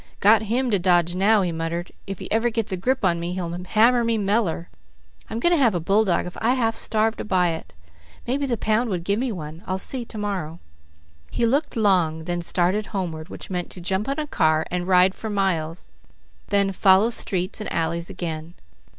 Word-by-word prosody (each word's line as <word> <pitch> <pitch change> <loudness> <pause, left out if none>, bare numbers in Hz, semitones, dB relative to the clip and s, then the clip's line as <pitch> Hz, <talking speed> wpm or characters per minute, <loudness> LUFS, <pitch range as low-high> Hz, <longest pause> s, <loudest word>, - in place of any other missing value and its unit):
"Got 210 +1 +5
him 240 +4 -1
to 200 - +3
dodge 175 -1 +2
now," 200 +3 +3
he 175 - -1
muttered. 165 +2 -4 0.2
"If 195 -1 -5
he - - -8
ever 225 +2 +2
gets 225 -3 -2
a - - 0
grip 250 +5 0
on 170 -2 +2
me 170 +1 -3
he'll 180 -2 -3
hammer 220 +7 +2
me 230 -1 +1
meller! 200 -5 0 0.6
I'm 225 - -3
going 345 - +2
to 340 -4 +3
have 230 -7 +3
a - - +1
bulldog 195 +2 +2
if 180 - -8
I 240 +3 +3
half 225 -3 0
starve 220 0 0
to - - -4
buy 185 -4 +2
it. 160 - -6 0.5
Maybe 275 +3 -1
the 240 -3 -1
pound 220 +3 +1
would 180 -4 -2
give 200 +4 0
me 255 -1 -1
one. 160 -3 -7
I'll 185 - -1
see 250 +5 0
to 225 - -9
morrow." 190 -6 -3 0.7
He 235 - 0
looked 280 +5 0
long, 180 -7 +2
then 175 +1 -2
started 185 +4 0
homeward, 170 -5 -4
which - - -9
meant 180 -1 -3
to - - -10
jump 190 +6 -2
on 275 - -1
a 310 - -2
car 155 - +1
and 180 0 -2
ride 185 0 +5
for 220 - -6
miles, 180 -5 -1 0.6
then 200 -1 +2
follow 195 +4 +4
streets 185 -2 -1
and 210 - -5
alleys 170 +1 -2
again. 165 0 -5
190 Hz, 210 wpm, -23 LUFS, 175-225 Hz, 0.7 s, Got